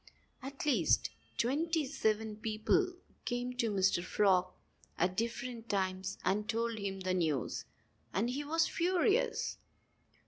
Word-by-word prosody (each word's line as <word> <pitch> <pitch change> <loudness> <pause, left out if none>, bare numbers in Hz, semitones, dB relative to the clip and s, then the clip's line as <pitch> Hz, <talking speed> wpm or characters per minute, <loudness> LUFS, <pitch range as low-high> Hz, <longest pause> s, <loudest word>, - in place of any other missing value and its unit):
At 275 +2 -6
least 290 - +3 0.3
twenty 310 +6 +1
seven 220 -5 0
people 225 - +1 0.3
came 245 0 -2
to 235 -2 +2
Mr. 190 -3 +2
Frog 185 -1 +3 0.5
at 180 +2 +1
different 235 +1 -3
times 190 -1 -1
and 210 +3 +1
told 230 -1 0
him 195 -1 -3
the 185 0 0
news. 155 -8 0 0.5
And 220 +7 0
he 280 +3 -2
was 325 +3 +2
furious. 370 +6 +1
225 Hz, 125 wpm, -34 LUFS, 195-275 Hz, 0.5 s, least